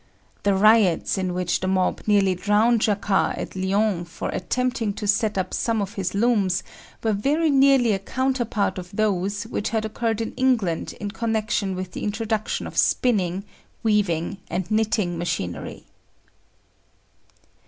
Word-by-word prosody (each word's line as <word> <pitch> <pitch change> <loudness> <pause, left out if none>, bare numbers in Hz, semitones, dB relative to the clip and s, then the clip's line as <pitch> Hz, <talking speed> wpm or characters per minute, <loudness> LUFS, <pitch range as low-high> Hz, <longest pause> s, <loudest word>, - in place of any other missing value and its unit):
The 200 -1 +2
riots 210 -3 +4
in 185 -1 -1
which 180 -1 0
the 185 - -2
mob 185 -1 +1
nearly 200 -3 +4
drowned 210 +5 +2
Jacquard 205 -2 +1
at - - -6
Lyons 190 -2 0
for - - -5
attempting 230 +2 -1
to 210 - -6
set 210 0 +1
up 185 -1 -2
some 230 -2 0
of 200 0 -3
his 195 -3 -3
looms 200 -5 +2 0.4
were 220 -1 +2
very 295 +10 +1
nearly 270 -4 +5
a 195 - 0
counterpart 240 -3 -1
of 180 +2 -10
those 200 -1 0
which 220 -1 -3
had 220 -1 -1
occurred 225 0 -2
in 225 - -3
England 240 -10 0
in 205 -1 -4
connection 220 -3 -1
with 185 0 -5
the - - -6
introduction 220 0 -2
of - - -2
spinning, 195 -6 +1 0.4
weaving 200 -4 +1
and 180 +3 -3
knitting 215 -5 +1
machinery. 90 - -4
205 Hz, 145 wpm, -23 LUFS, 190-225 Hz, 0.4 s, nearly